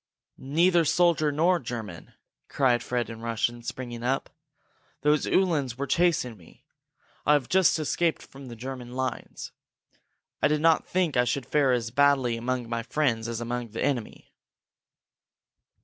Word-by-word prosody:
"Neither 170 +5 +3
soldier 165 -2 +2
nor 170 +5 +2
German!" 110 - -7 0.4
cried 125 -4 +2
Fred 120 -1 -2
in 115 0 -9
Russian, 115 +1 -2
springing 120 -1 -6
up. 130 +3 -1 0.7
"Those 150 +1 +2
Uhlans 150 -10 +1
were 140 - -2
chasing 145 -6 +1
me! 85 -4 -20 0.6
I 150 - +4
have 145 -4 +1
just 190 -1 +3
escaped 160 +2 0
from 135 -1 -12
the 120 - -8
German 125 0 -7
lines. 130 -1 -4 0.9
I - - +5
did 150 0 +1
not 165 +1 +3
think 180 -4 0
that 125 - +3
I - - 0
should 130 +1 -1
fare 145 -3 +2
as 115 -2 -1
badly 135 -3 +3
among 125 +1 -3
my 115 0 -2
friends 120 -3 -1
as 115 -1 -4
among 120 0 -3
the 115 - -3
enemy!" 125 -6 -3
130 Hz, 150 wpm, -26 LUFS, 120-150 Hz, 0.9 s, I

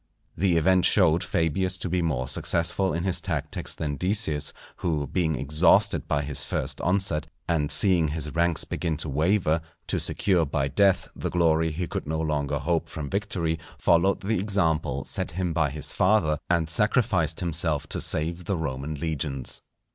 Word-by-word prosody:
The 90 -1 +2
event 90 +3 +3
showed 85 -4 +4
Fabius 90 +3 0
to 90 - -4
be 90 +1 0
more 70 -7 -1
successful 85 +6 +1
in 85 - -2
his 95 -1 0
tactics - - -3
than 75 -2 -3
Decius, 90 -6 0 0.3
who 75 -4 -1
being 80 +2 0
exhausted 70 +4 +2
by 75 0 0
his 70 0 -3
first - - -3
onset, 90 -4 0 0.2
and 75 -4 0
seeing 90 -5 +3
his 75 -1 -2
ranks 85 0 +2
begin 80 -3 -3
to 80 0 -4
waver, 80 +2 +1 0.2
to - - -1
secure 90 -4 +1
by 70 -2 -1
death 95 +6 +2
the - - -3
glory 80 -2 +2
he 85 +3 -3
could - - -5
no 80 +1 -2
longer 75 -2 -1
hope 80 +2 -1
from 75 -5 -6
victory, 90 -5 -1 0.2
followed 85 +3 +2
the 105 +1 0
example 80 -9 0
set - - -2
him 90 0 -2
by 80 -3 +1
his 75 +2 -3
father, 90 -7 +2
and 85 -3 +2
sacrificed 90 -3 +2
himself 80 -4 +1
to - - -1
save 85 +3 0
the 100 - -1
Roman 75 -1 -4
legions. 70 -3 -3
80 Hz, 170 wpm, -26 LUFS, 75-90 Hz, 0.3 s, showed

